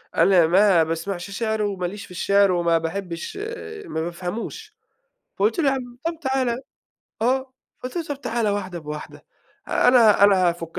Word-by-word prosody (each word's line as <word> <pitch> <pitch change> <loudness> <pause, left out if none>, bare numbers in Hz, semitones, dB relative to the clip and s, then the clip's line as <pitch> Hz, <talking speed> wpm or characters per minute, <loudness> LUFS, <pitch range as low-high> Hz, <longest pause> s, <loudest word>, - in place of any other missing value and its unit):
أنا 180 -4 +5
ما 185 -1 +5
باسمعش 170 +4 -4
شِعر 220 0 -1
وماليش 200 0 -3
في - - -17
الشِعر 200 +2 +3
وما 170 -2 +2
باحبّش 170 - -5 0.5
ما 160 - -3
بافهموش." 185 - -6 0.6
فقُلت 215 +7 +2
له: 325 - +2
"يا - - +1
عَم 245 -2 -6
طَب 335 -1 -2
تعال،" 260 -4 0 0.6
آه، 260 +2 0 0.3
قُلت 255 +7 -6
له: 340 - 0
"طَب 290 -2 -6
تعال 230 -4 -1
واحدة 190 -3 -3
بواحدة، 150 -1 -8 0.4
أنا 230 -5 +5
أنا 190 -3 +5
هافُك 170 -1 -4
200 Hz, 150 wpm, -23 LUFS, 175-240 Hz, 0.6 s, أنا